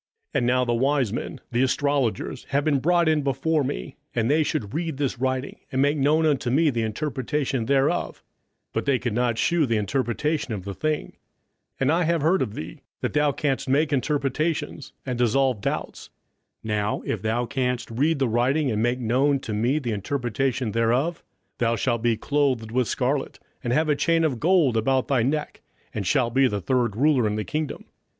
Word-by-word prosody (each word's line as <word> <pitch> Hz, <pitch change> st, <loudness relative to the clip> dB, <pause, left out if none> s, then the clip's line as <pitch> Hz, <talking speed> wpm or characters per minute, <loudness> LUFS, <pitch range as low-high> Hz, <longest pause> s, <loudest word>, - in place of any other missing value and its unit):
27:005:015 -, -, +1 dB
And 120 Hz, -, 0 dB
now 125 Hz, +1 st, +2 dB
the 120 Hz, -, 0 dB
wise 130 Hz, -2 st, +1 dB
men, -, -, -4 dB
the 120 Hz, +1 st, +1 dB
astrologers, 130 Hz, -3 st, 0 dB
have 140 Hz, +1 st, 0 dB
been 145 Hz, -3 st, +2 dB
brought 170 Hz, +3 st, +3 dB
in 155 Hz, -1 st, +3 dB
before 140 Hz, +3 st, 0 dB
me, 60 Hz, -, -5 dB, 0.2 s
that 115 Hz, -1 st, 0 dB
they 155 Hz, +2 st, +4 dB
should 130 Hz, -9 st, -2 dB
read 160 Hz, -2 st, -2 dB
this 135 Hz, -4 st, -2 dB
writing, 130 Hz, +1 st, -2 dB
and 130 Hz, -, -1 dB
make 145 Hz, +2 st, +3 dB
known 150 Hz, +3 st, +3 dB
unto 140 Hz, -5 st, +1 dB
me 150 Hz, +4 st, +3 dB
the 120 Hz, -2 st, -1 dB
interpretation 130 Hz, +1 st, -2 dB
thereof: 135 Hz, 0 st, +1 dB, 0.5 s
but -, -, -1 dB
they 140 Hz, -2 st, +3 dB
could 120 Hz, -2 st, -3 dB
not 120 Hz, 0 st, +1 dB
shew 170 Hz, 0 st, +2 dB
the 115 Hz, -2 st, +1 dB
interpretation 130 Hz, +4 st, -1 dB
of 95 Hz, -2 st, -7 dB
the 100 Hz, -, -4 dB
thing: 155 Hz, +7 st, -2 dB, 0.7 s
27:005:016 -, -, -19 dB
And 135 Hz, +2 st, +3 dB
I 170 Hz, +2 st, +2 dB
have 170 Hz, -1 st, +1 dB
heard 180 Hz, +5 st, +3 dB
of 110 Hz, -4 st, -2 dB
thee, 80 Hz, -, -7 dB, 0.2 s
that -, -, -2 dB
thou 150 Hz, -1 st, +3 dB
canst 140 Hz, -1 st, -2 dB
make 145 Hz, +3 st, +2 dB
interpretations, 145 Hz, +3 st, -1 dB
and 125 Hz, -2 st, -3 dB
dissolve 125 Hz, -1 st, +2 dB
doubts: -, -, -4 dB, 0.5 s
now 105 Hz, -1 st, -1 dB
if -, -, -2 dB
thou 115 Hz, +2 st, 0 dB
canst 125 Hz, -1 st, -2 dB
read 145 Hz, +7 st, +1 dB
the 135 Hz, -2 st, +1 dB
writing, 130 Hz, +5 st, +1 dB
and 105 Hz, 0 st, 0 dB
make 120 Hz, +2 st, +1 dB
known 130 Hz, +4 st, +2 dB
to 110 Hz, -, -5 dB
me 120 Hz, +7 st, +1 dB
the 125 Hz, -6 st, -2 dB
interpretation 125 Hz, +2 st, -1 dB
thereof, 125 Hz, +10 st, +1 dB, 0.4 s
thou 115 Hz, -1 st, +2 dB
shalt 115 Hz, -1 st, 0 dB
be 115 Hz, -1 st, +2 dB
clothed 130 Hz, -4 st, 0 dB
with 125 Hz, -1 st, +1 dB
scarlet, 135 Hz, +4 st, -1 dB, 0.2 s
and 120 Hz, -, -1 dB
have 155 Hz, +5 st, +2 dB
a 150 Hz, -, +3 dB
chain 165 Hz, +2 st, +2 dB
of 140 Hz, -7 st, 0 dB
gold 165 Hz, -6 st, +3 dB
about 130 Hz, +4 st, +1 dB
thy 135 Hz, -4 st, +2 dB
neck, 150 Hz, +5 st, -2 dB, 0.3 s
and 100 Hz, -4 st, -3 dB
shalt 120 Hz, -2 st, +2 dB
be 135 Hz, 0 st, +4 dB
the 105 Hz, -4 st, -2 dB
third 120 Hz, +1 st, 0 dB
ruler 135 Hz, -2 st, +3 dB
in 105 Hz, -, -1 dB
the 105 Hz, -, -2 dB
kingdom. 155 Hz, -1 st, -3 dB
130 Hz, 195 wpm, -24 LUFS, 120-150 Hz, 0.7 s, they